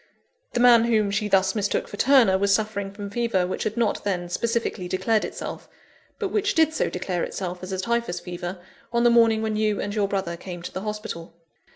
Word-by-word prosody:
The - - 0
man 240 -2 +7
whom 215 -3 +2
she 210 +1 0
thus 190 -1 +3
mistook 205 -2 -1
for - - -8
Turner, 245 -4 +5
was 200 +1 +2
suffering 200 -1 0
from 200 0 -7
fever 230 -5 +1
which 185 - -3
had 215 +2 -2
not 230 -3 0
then 180 -3 -2
specifically 230 -2 -1
declared 215 +4 +1
itself; - - -6 0.5
but 410 - -2
which 405 +1 0
did 320 -1 +4
so - - 0
declare 180 -1 -2
itself, 180 -2 -4
as 185 +1 -7
a 190 - -2
Typhus 230 -2 -1
fever, 175 +1 -6 0.3
on 235 0 +2
the 240 - +5
morning 225 -2 +4
when 220 -1 -1
you 215 -1 +1
and 205 - -3
your 205 -2 +1
brother 190 -4 -2
came 175 -1 -8
to - - -6
the 190 - -4
hospital. 210 -6 -6
205 Hz, 210 wpm, -24 LUFS, 190-230 Hz, 0.5 s, man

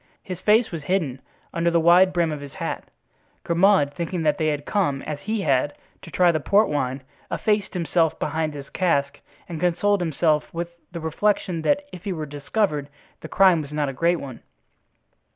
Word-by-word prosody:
His 185 -2 -6
face 220 +4 +3
was 165 -2 -5
hidden 155 -9 -1 0.3
under 170 0 +1
the 170 0 +2
wide 175 +3 +6
brim 170 -3 +1
of 150 -2 -5
his 140 -1 -10
hat. - - -4 0.6
Grimaud, 170 -4 +3
thinking 170 0 -3
that 150 -1 +1
they 155 - +1
had 145 -1 -1
come, 145 -10 0
as 150 -2 -5
he 215 +4 -2
had, 145 -3 +1 0.3
to - - -11
try 175 +1 +4
the 155 - -1
port 200 +8 +3
wine, 130 -2 -2 0.3
effaced 210 -3 -1
himself 165 -1 +1
behind 155 0 -2
his 140 -1 -8
cask 140 -6 0 0.3
and 165 -3 -6
consoled 180 +3 +1
himself 155 -2 +1
with 170 +1 -4 0.2
the 170 - -6
reflection 170 +1 0
that 290 - +1
if 180 - -9
he 200 -3 -2
were 155 -3 -4
discovered 145 +1 -2 0.3
the - - -9
crime 185 -4 +5
was 145 -1 -9
not 150 -2 -1
a - - -5
great 170 +6 +2
one. 130 -4 -8
165 Hz, 190 wpm, -23 LUFS, 145-185 Hz, 0.6 s, wide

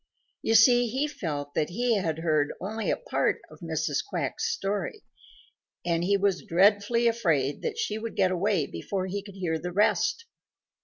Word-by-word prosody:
You 225 - +1
see, 240 +2 +6
he 265 +6 -1
felt 145 - -5
that 150 - 0
he 235 +5 +1
had 165 -5 -1
heard 155 -3 +1
only 215 +3 -3
a - - +1
part - - 0
of - - -14
Mrs. - - -1
Quack's 410 - -2
story, 205 - -3 0.8
and 170 -1 +1
he 200 +3 +3
was 195 -2 +1
dreadfully 205 +6 +3
afraid 160 - +1
that - - -3
she 215 +1 -2
would 230 -1 -6
get 185 -2 +3
away 185 -3 +1
before 185 - -4
he 200 +2 -3
could 200 -1 -12
hear 170 -4 -2
the 180 +2 -5
rest. 210 - +2
195 Hz, 170 wpm, -27 LUFS, 170-225 Hz, 0.8 s, see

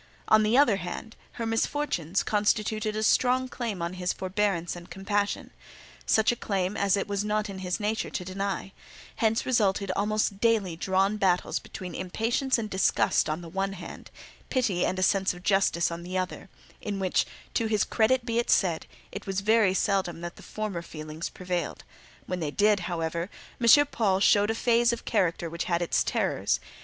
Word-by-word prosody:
On 215 - +6
the 215 +3 +3
other 240 -8 +5
hand, 190 +5 -6 0.2
her 230 - -4
misfortunes, 225 - 0
constituted 215 0 0
a 215 - -1
strong 255 +3 +3
claim 230 -8 -4
on 170 +1 -3
his 180 0 -1
forbearance 185 -3 -1
and 175 +1 -11
compassion—such 205 +3 -1
a - - -2
claim 195 -3 -2
as 200 -1 +2
it 200 - -2
was 200 0 -1
not 210 0 -1
in 190 - -7
his 180 -1 -2
nature 215 +1 -1
to 180 - -4
deny; 195 +1 -3 0.5
hence 225 0 +1
resulted 200 -5 +1
almost 210 0 0
daily 215 -7 +2
drawn 190 +4 +1
battles 185 -3 +1
between 180 -2 -8
impatience 230 +9 0
and 215 -3 -4
disgust 190 -4 +2
on 155 +3 -2
the 170 - -9
one 195 +3 -2
hand, 180 -3 -9 0.4
pity 220 -10 +1
and 185 - -2
a 185 - 0
sense 190 -1 +2
of 180 - -13
justice 195 -4 +2
on 170 0 -5
the 180 +2 -4
other; 185 +1 -4 0.3
in 205 -2 -3
which, 190 -2 +1 0.3
to 230 - +1
his 215 -1 +2
credit 240 +2 +2
be 230 -1 0
it 240 - -1
said, 175 -5 +2 0.2
it 200 +1 -8
was 195 0 -1
very 210 -2 +3
seldom 190 -4 0
that 175 0 -6
the - - -14
former 215 -5 -4
feelings 155 -1 -6
prevailed: 180 -3 -4 0.4
when 180 - -3
they 155 -3 -2
did, 205 +5 +3
however, 170 +1 -2 0.3
M. 290 +5 +7
Paul 205 -8 +1
showed 205 +1 +4
a 225 - 0
phase 235 0 +3
of 235 - -5
character 175 -5 0
which 170 +1 -4
had 175 -1 0
its 170 - +1
terrors. 60 - 0
195 Hz, 180 wpm, -27 LUFS, 180-220 Hz, 0.5 s, M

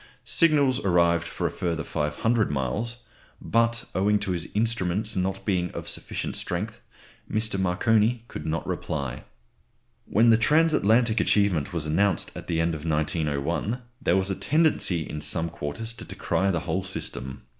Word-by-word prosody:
Signals 145 -6 +3
arrived 85 -2 +2
for - - -4
a - - +1
further 85 -3 -2
500 95 +10 0
miles, 105 - -2 0.4
but 115 0 +1
owing 105 +2 +3
to 100 -2 -3
his 85 -2 -3
instruments 105 -1 0
not 95 +1 -2
being 90 -3 +1
of - - -6
sufficient - - -4
strength, 100 +5 -3 0.5
Mr. 110 -2 0
Marconi 110 +5 +2
could 75 - -7
not 80 +2 -2
reply. 70 -4 -4 0.8
When 115 +2 +5
the 110 - +5
transatlantic 120 -5 +3
achievement 100 -6 +2
was 85 -3 -3
announced 95 +6 +1
at - - -8
the 85 -1 0
end 85 +1 +1
of 75 -2 -6
1901, 80 - -1 0.2
there 95 -8 +3
was 95 +1 0
a - - -1
tendency 95 - +2
in 75 - -5
some 80 +1 0
quarters 85 +10 -5
to 115 - -9
decry 95 - -1
the 85 -4 0
whole 95 - -2
system. 65 -8 -5
95 Hz, 155 wpm, -26 LUFS, 85-115 Hz, 0.8 s, When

